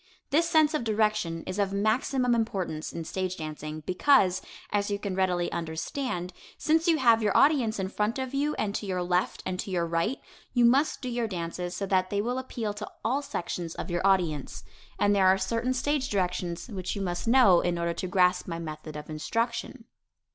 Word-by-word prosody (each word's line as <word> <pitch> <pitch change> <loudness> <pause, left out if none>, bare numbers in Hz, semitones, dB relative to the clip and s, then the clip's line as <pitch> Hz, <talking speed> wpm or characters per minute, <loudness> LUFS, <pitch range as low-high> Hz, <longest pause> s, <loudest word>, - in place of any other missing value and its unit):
This 330 +4 +3
sense 315 -2 +4
of 305 - 0
direction 215 -6 0
is 185 - -4
of 200 -1 +1
maximum 240 +5 +1
importance 190 -9 -2
in 165 - -5
stage 185 +1 -3
dancing, 155 0 -6
because, 185 - +3 0.3
as 205 0 0
you 205 - 0
can 200 -1 -4
readily 180 -2 +1
understand, 175 - -3 0.2
since 320 +2 +2
you 330 -2 +4
have 230 -5 +5
your 210 -2 +2
audience 265 -7 +4
in 190 -1 -1
front 210 +4 -1
of 260 0 -4
you 290 +2 0
and 205 -2 -1
to 205 - -3
your 180 -1 -1
left 180 +1 0
and 185 0 -2
your 180 -3 0
right, 170 +9 -1 0.3
you 245 -2 +4
must 270 +5 +3
do - - -3
your 240 -1 -1
dances 175 -1 -4
so 200 - -2
that 185 -1 +1
they 200 - -1
will 245 +5 -1
appeal 235 -5 -4
to 210 - -7
all 265 +5 +1
sections 175 - -4
of - - -5
your 175 0 0
audience. 175 -7 +1 0.3
And 205 0 +3
there 190 -2 +4
are 190 +1 +5
certain 230 +7 -1
stage 275 +1 0
directions 180 -3 -2
which 195 -5 -4
you 200 - -3
must 175 +2 -3
know 230 -8 +6
in 175 -1 0
order 170 0 -1
to 185 - -4
grasp 180 -1 +2
my 165 -2 -3
method 155 -2 -7
of 150 0 -7
instruction. 230 - -3
195 Hz, 200 wpm, -28 LUFS, 175-240 Hz, 0.3 s, know